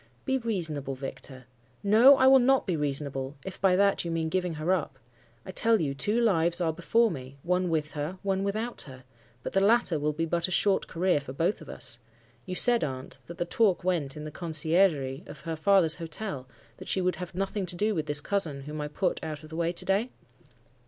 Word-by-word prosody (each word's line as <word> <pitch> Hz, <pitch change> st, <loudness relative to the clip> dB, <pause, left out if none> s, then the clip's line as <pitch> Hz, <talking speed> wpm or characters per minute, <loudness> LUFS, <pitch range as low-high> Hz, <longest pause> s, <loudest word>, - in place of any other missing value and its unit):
"'Be 265 Hz, 0 st, +1 dB
reasonable, 160 Hz, -, -2 dB
Victor.' 130 Hz, -1 st, -8 dB, 0.4 s
"'No, 230 Hz, +7 st, +7 dB
I 260 Hz, -, +4 dB
will 265 Hz, 0 st, +8 dB
not 265 Hz, +2 st, +3 dB
be 180 Hz, -, -1 dB
reasonable, 140 Hz, -2 st, -2 dB
if 190 Hz, -, -8 dB
by 185 Hz, -1 st, +4 dB
that 200 Hz, +1 st, +2 dB
you 170 Hz, -, -4 dB
mean 165 Hz, -1 st, -1 dB
giving 180 Hz, -1 st, -1 dB
her 155 Hz, +4 st, 0 dB
up. 150 Hz, -7 st, -3 dB, 0.5 s
I -, -, -7 dB
tell 225 Hz, +3 st, +2 dB
you 145 Hz, -5 st, -1 dB
two 205 Hz, +12 st, 0 dB
lives 170 Hz, -6 st, +2 dB
are 165 Hz, -2 st, 0 dB
before 225 Hz, +7 st, +2 dB
me; 135 Hz, -2 st, -8 dB
one 180 Hz, +1 st, 0 dB
with 155 Hz, -2 st, -1 dB
her, 155 Hz, +5 st, -4 dB
one 195 Hz, -1 st, 0 dB
without 215 Hz, +4 st, -2 dB
her. 130 Hz, 0 st, -12 dB, 0.4 s
But -, -, -5 dB
the 195 Hz, -, +3 dB
latter 205 Hz, -6 st, +3 dB
will 150 Hz, +1 st, 0 dB
be 165 Hz, +2 st, -1 dB
but 170 Hz, +1 st, 0 dB
a -, -, -7 dB
short 195 Hz, +2 st, +2 dB
career 175 Hz, -2 st, +1 dB
for 130 Hz, -2 st, -8 dB
both 165 Hz, +8 st, -1 dB
of 155 Hz, -, -12 dB
us. 120 Hz, -, -5 dB, 0.5 s
You 185 Hz, -, -4 dB
said, 240 Hz, +4 st, +4 dB
aunt, 130 Hz, -3 st, -5 dB
that 170 Hz, -, -9 dB
the 175 Hz, -, -1 dB
talk 195 Hz, 0 st, +1 dB
went 160 Hz, -7 st, 0 dB
in 150 Hz, -, -6 dB
the 155 Hz, -, -7 dB
conciergerie 155 Hz, -4 st, +1 dB
of -, -, -11 dB
her 165 Hz, +2 st, -4 dB
father's 175 Hz, -1 st, +3 dB
hotel, 165 Hz, -4 st, -4 dB, 0.3 s
that -, -, -11 dB
she -, -, +1 dB
would 180 Hz, 0 st, 0 dB
have 180 Hz, -1 st, -7 dB
nothing 195 Hz, 0 st, -2 dB
to 175 Hz, -, +1 dB
do 210 Hz, +4 st, +1 dB
with 155 Hz, -5 st, -3 dB
this 145 Hz, 0 st, +3 dB
cousin 160 Hz, -7 st, 0 dB
whom 150 Hz, +2 st, -6 dB
I 150 Hz, -, -3 dB
put 175 Hz, +5 st, -2 dB
out 155 Hz, -1 st, -6 dB
of 155 Hz, -, -12 dB
the -, -, -6 dB
way 170 Hz, 0 st, 0 dB
to 175 Hz, -, -1 dB
day? 200 Hz, +6 st, +1 dB
170 Hz, 220 wpm, -28 LUFS, 150-195 Hz, 0.5 s, will